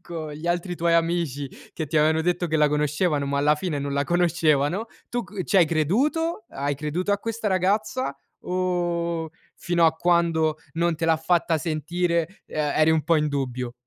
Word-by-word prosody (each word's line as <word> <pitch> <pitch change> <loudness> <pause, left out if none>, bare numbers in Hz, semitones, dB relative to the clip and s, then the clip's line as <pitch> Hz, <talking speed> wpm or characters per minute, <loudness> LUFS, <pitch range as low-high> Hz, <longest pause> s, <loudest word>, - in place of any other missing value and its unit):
con 160 -3 -6
gli 155 +3 -7
altri 175 +1 -1
tuoi 170 0 +2
amici 165 -5 0 0.3
che 160 - -3
ti 155 +1 +1
avevano 160 +1 +3
detto 175 0 0
che 160 0 0
la 150 -1 +4
conoscevano 150 0 0
ma 140 0 -1
alla 150 +2 +4
fine 155 -2 -3
non 140 0 -3
la 140 0 +1
conoscevano, 170 +2 +1 0.2
tu 245 0 -1
c 200 -4 -6
ci 200 - +1
hai 170 - +6
creduto, 225 - 0
hai 140 +1 -2
creduto 155 +7 -2
a 200 - +1
questa 225 0 -4
ragazza, 210 +6 0 0.2
o 175 -2 -1 0.3
fino 175 -1 +1
a 160 - +5
quando 165 -2 +2 0.2
non 170 0 +1
te 165 - -2
l'ha 165 -1 +3
fatta 165 -1 +1
sentire, 170 +3 -1
uhm, - - -10
eri 155 +1 +2
un 160 -1 +2
po' 165 -2 +3
in 150 0 +1
dubbio? 125 -3 -3
165 Hz, 185 wpm, -24 LUFS, 150-180 Hz, 0.3 s, hai